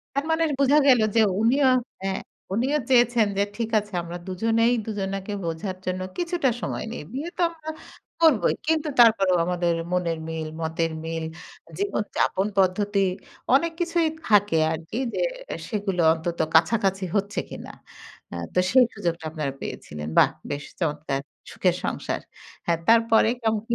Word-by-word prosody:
তার 280 - 0
মানে 320 +1 +2 0.2
বোঝা 280 +2 +5
গেল 255 -4 +6 0.2
যে - - +6 0.2
উনিও 260 +4 +4 0.3
হ্যাঁ 195 0 -2 0.3
উনিও 265 +8 +1
চেয়েছেন 240 -3 +4
যে - - +4
ঠিক 230 -1 -2
আছে 205 -1 -6
আমরা 170 +1 -7
দুজনেই 225 +5 +2
দুজনাকে 195 -1 -3
বোঝার 170 +3 -3
জন্য 185 0 -2 0.2
কিছুটা 345 -6 +1
সময় - - -3
নেই। - - -6
বিয়ে 290 +6 -4
তো - - -5
আমরা 315 -2 -8 0.5
করবোই। 315 -9 +4
কিন্তু 315 -1 +1
তারপরেও 195 -6 +5
আমাদের 175 -1 +1 0.2
মনের 170 -3 0
মিল, 160 -1 -4
মতের 165 0 -1
মিল, 165 0 -3 0.5
জীবনযাপন 210 - 0
পদ্ধতি 200 +2 +2 0.5
অনেক 335 +4 +3
কিছুই 335 -1 +1 0.2
থাকে 205 -6 +4
আর 160 - -2
কি 230 - -3 0.2
যে - - -1 0.5
সেগুলো 200 -5 -1
অন্তত 165 +1 -3 0.2
কাছাকাছি 195 +2 +3
হচ্ছে 200 +1 -1
কিনা। - - -9 0.6
আ - - -5 0.2
তো - - +1
সেই 255 0 +6
সুযোগটা 170 -1 -3
আপনারা 150 -4 -3
পেয়েছিলেন। 75 0 -6
বাহ - - +6 0.2
বেশ 145 0 -3 0.2
চমৎকার 150 -3 -1 0.3
সুখের - - +1
সংসার। - - -2 0.5
হ্যাঁ 170 -1 +2
তারপরে 225 -1 +5
কেমন 220 -2 0
কি? 235 - +1
205 Hz, 150 wpm, -25 LUFS, 175-245 Hz, 0.6 s, গেল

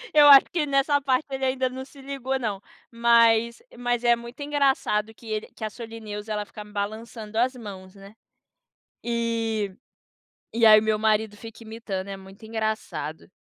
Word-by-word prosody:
Eu 295 -1 +8
acho 275 -2 +10
que 310 -4 0
nessa 280 +1 +2
parte 265 +1 +1
ele 270 0 -4
ainda 260 0 +1
não 260 +1 -7
se 275 +1 -16
ligou 270 -1 -3
não, 210 -6 -3 0.3
mas 235 - +3 0.2
mas 245 -1 -1
é 240 0 +5
muito 235 +3 -11
engraçado 275 -7 +1
que 225 - -18
ele 215 -1 -3
que - - -9
a 215 - -2
Solineusa 220 -2 -7
ela 210 -1 -2
fica 210 - -10
balançando 215 +1 -6
as 255 +2 +2
mãos, 195 -5 -10
né, 195 +2 -14 0.9
e 225 -4 -1 0.8
e 230 0 +2
aí 215 -1 +9
meu 215 0 0
marido 215 -1 +1
fica 225 +2 -11
imitando, 220 -4 -5
é 195 - -5
muito 195 +3 -13
engraçado. 220 -7 -4
225 Hz, 165 wpm, -25 LUFS, 210-255 Hz, 0.9 s, acho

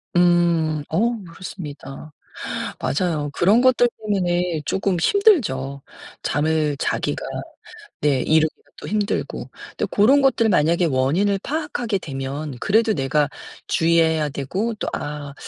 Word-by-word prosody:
음. 170 -3 +3
어 230 +8 +1
그렇습니다. 155 -5 -9 0.7
맞아요. 150 -2 -1
그런 205 +7 +4
것들 255 -1 +4
때문에 180 -5 0
쪼금 195 -1 0
힘들죠, 150 - +2 0.4
잠을 150 0 0
자기가. - - -2 0.8
네 140 -4 +2
이루기가 155 +2 +1
또 - - -8
힘들고. 210 0 -2 0.3
근데 - - 0
고런 265 +8 +5
것들 235 -4 +3
만약에 170 0 +3
원인을 165 +9 +1
파악하게 280 -8 -2
되면 135 -1 -5
그래도 220 +2 +2
내가 145 +1 +1 0.4
주의해야 160 -2 +2
되고 185 - -2
또 - - -5
'아 145 -1 -5
170 Hz, 260 characters per minute, -22 LUFS, 150-205 Hz, 0.8 s, 고런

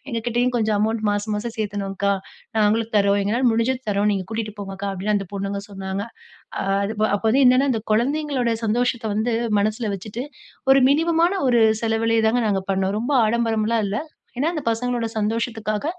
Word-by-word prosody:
"எங்க 235 -4 -2
கிட்டயும் 240 +1 +1
கொஞ்சம் 220 -2 +1
அமௌண்ட் 220 +1 0
மாசம் 205 +1 -1
மாசம் 220 +2 -4
சேத்துணோம்கா. 200 -2 -1 0.4
நாங்களும் 220 +1 +2
தரோம் 200 0 +3
எங்களால 230 +6 0
முடிஞ்சத 230 +3 0
தரோம் 205 0 +1
நீங்க 190 -2 -2
கூட்டிட்டு 220 -1 -4
போங்க 195 -1 -6
அக்கா" 200 +1 -4
அப்படின்னு 195 +3 -1
அந்த 195 -1 -3
பொண்ணுங்க 200 0 -3
சொன்னாங்க. 195 0 -4 0.6
அ - - -2 0.2
அதுப 210 +1 -3
அப்போ 205 - -5
வந்து 270 +5 +4
என்னன்னா 255 +2 +5
அந்த 225 -3 -1
கொழந்தைங்களோட 260 +1 +1
சந்தோஷத்த 240 +1 0
வந்து 220 +3 0 0.3
மனசில 215 +1 -1
வச்சுட்டு 215 +6 -6 0.5
ஒரு 270 0 +6
மினிமமான 335 +5 +2
ஒரு 240 -2 +4 0.2
செலவிலயே 225 0 +1
தாங்க 240 +2 +2
நாங்க 195 -2 0
பண்ணோம். 190 +1 0
ரொம்ப 250 +5 -1
ஆடம்பரம்லாம் 225 0 +1
இல்ல. 205 +2 -2 0.4
ஏன்னா 290 +5 +1
அந்த 305 - -3
பசங்களோட 240 0 -1
சந்தோஷத்துக்காக 220 +1 -2
220 Hz, 170 wpm, -22 LUFS, 205-240 Hz, 0.6 s, ஒரு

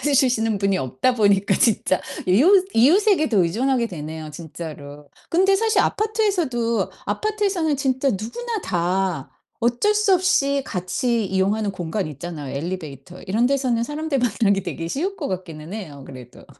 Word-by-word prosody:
주시는 225 -5 +2
분이 195 -1 +1
없다 130 - 0
보니까 200 -2 +3
진짜 210 -4 +2 0.3
이웃 350 - +5
이웃에게도 310 - +4
의존하게 235 +7 0
되네요, 155 -3 -7
진짜로. 150 -3 -9 0.2
근데 380 +3 +4
사실 445 +2 +2
아파트에서도 360 - 0 0.2
아파트에서는 400 -8 0
진짜 270 0 +1
누구나 385 - -4
다 180 -3 -1 0.3
어쩔 245 - +2
수 420 -2 +3
없이 280 -7 +2
같이 225 +5 -1
이용하는 195 +2 0
공간 180 +1 -3
있잖아요, 150 -2 -7
엘리베이터. 165 0 -6
이런 220 +6 +1
데서는 255 -4 +1
사람들 295 0 -2
만나기 200 -4 +1
되게 165 -1 -5
쉬울 360 - -2
것 - - -3
같기는 175 -2 -6
해요 150 -11 -7
그래도. 125 -2 -12
220 Hz, 350 characters per minute, -22 LUFS, 175-285 Hz, 0.3 s, 이웃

